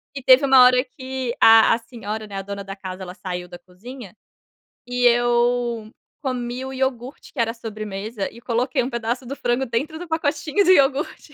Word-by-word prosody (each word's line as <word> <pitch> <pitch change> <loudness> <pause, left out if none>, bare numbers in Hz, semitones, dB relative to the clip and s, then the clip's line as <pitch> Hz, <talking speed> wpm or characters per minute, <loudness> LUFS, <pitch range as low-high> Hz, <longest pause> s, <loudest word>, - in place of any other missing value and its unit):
e 275 - -6
teve 260 +2 +6
uma 265 -2 +7
hora 250 0 +5
que 260 -2 -5
a 225 0 +7
a - - -2
senhora, 220 -2 -7
né, 200 -2 -9
a 195 - -3
dona 200 0 -6
da 195 0 -8
casa 190 -1 -8
ela 180 -1 -8
saiu 180 -2 -6
da 175 0 -10
cozinha, 200 +5 -12 0.7
e 245 0 -2
eu 240 -1 +1 0.3
comi 250 -2 -3
o 265 - -6
iogurte 260 0 -4
que 280 - -8
era 230 -1 +1
a - - -10
sobremesa 215 -2 -6
e 235 - -14
coloquei 245 +2 -1
um 250 - -3
pedaço 235 +1 -3
do 270 +3 -6
frango 245 0 -1
dentro 275 +7 -3
do 355 +2 -8
pacotinho 315 +3 0
do 370 - +5
iogurte. 280 -1 +1
240 Hz, 195 wpm, -22 LUFS, 215-265 Hz, 0.7 s, uma